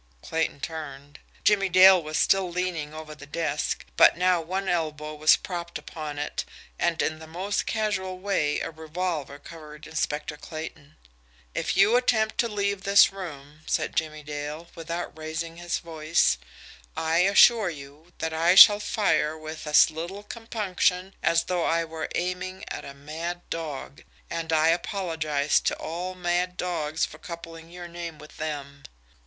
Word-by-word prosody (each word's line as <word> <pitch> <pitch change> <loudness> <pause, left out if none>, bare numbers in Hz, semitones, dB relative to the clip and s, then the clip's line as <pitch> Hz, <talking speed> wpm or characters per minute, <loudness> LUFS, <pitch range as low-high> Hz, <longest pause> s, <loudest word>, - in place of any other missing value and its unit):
Clayton 160 -3 -2
turned. 145 -3 -7 0.2
Jimmie 195 -2 +3
Dale 185 0 +8
was 155 -1 -3
still 195 -2 +3
leaning 170 -4 -2
over 155 0 -8
the 145 -1 -12
desk, 150 -1 -2
but - - +7
now 180 -1 +3
one 190 +4 -3
elbow 155 -3 -1
was 155 +1 +5
propped 170 -2 -5
upon 150 -2 -7
it, 145 - -3 0.4
and 170 -1 +1
in 155 0 -2
the 160 - -11
most 185 +5 -2
casual 195 -4 -1
way 185 -6 0
a - - -4
revolver 160 -2 -4
covered 150 0 -12
Inspector 150 -1 -2
Clayton. 155 -2 -8 0.6
"If - - -1
you 200 +4 +6
attempt 220 -3 +1
to 235 - +3
leave 200 -2 -1
this 200 0 +6
room," 150 -5 -9
said - - -1
Jimmie 155 -1 -2
Dale, 150 +3 -6
without 170 +1 -5
raising 160 +1 -5
his 175 0 -2
voice, 160 - +1 0.6
"I 160 +1 +1
assure 200 +2 +6
you 150 +2 -11
that 160 0 -3
I 165 +3 +3
shall 205 +1 +10
fire 200 -8 +1
with 155 0 -8
as 150 +1 +6
little 175 +6 -6
compunction 200 -4 -1
as 170 0 +3
though 180 -2 -1
I 165 0 +1
were 160 -1 -5
aiming 185 +1 -3
at - - -6
a 140 - -9
mad 165 +5 -6
dog 150 -4 -5 0.3
and 165 -1 -3
I 160 0 +4
apologise 160 -5 0
to - - 0
all 180 +3 -5
mad 180 0 -1
dogs 165 -3 -1
for - - -12
coupling 165 -1 -9
your 175 0 -8
name 170 -2 -7
with 150 0 -14
them." 140 -2 -5
165 Hz, 155 wpm, -26 LUFS, 155-185 Hz, 0.6 s, shall